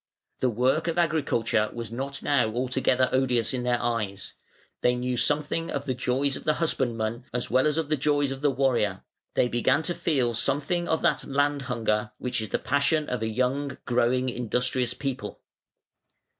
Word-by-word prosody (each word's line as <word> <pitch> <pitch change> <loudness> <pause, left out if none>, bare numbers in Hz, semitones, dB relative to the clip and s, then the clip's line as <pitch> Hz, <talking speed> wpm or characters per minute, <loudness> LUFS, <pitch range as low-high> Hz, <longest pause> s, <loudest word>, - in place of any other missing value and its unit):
The 130 - +2
work 130 +8 +1
of 165 0 -1
agriculture 140 -10 +1
was 115 -2 -6
now 130 +4 -2
not 140 0 -6 0.3
altogether 130 0 +2
odious 125 -3 +2
in 125 - -1
their 120 0 +1
eyes; 105 -5 -2 0.5
they 125 - +3
knew 125 0 -1
something 150 +5 0
of 140 0 -3
the 130 - 0
joys 130 +2 0
of - - -8
the 155 - +2
husbandman 120 -7 -1
as 125 -2 -3
well 130 +4 +4
as 150 0 0
of 165 -2 0
the 155 - +1
joys 145 0 +1
of 135 0 -5
the 145 - +3
warrior; 125 -8 +1 0.3
they - - +3
began 120 +6 +2
to 175 - -1
feel 145 -9 0
something 145 +9 0
of 160 - 0
that 150 -1 +2
"land 145 +1 +1
hunger" 110 -2 0
which 125 -2 -2
is 110 - -5
the - - +1
passion 145 +4 +1
of 125 -2 -2
a 110 - 0
young, 130 +4 -1
growing, 125 +1 +2
industrious 125 +1 -1
people. 135 -2 -4
130 Hz, 180 wpm, -26 LUFS, 120-145 Hz, 0.5 s, well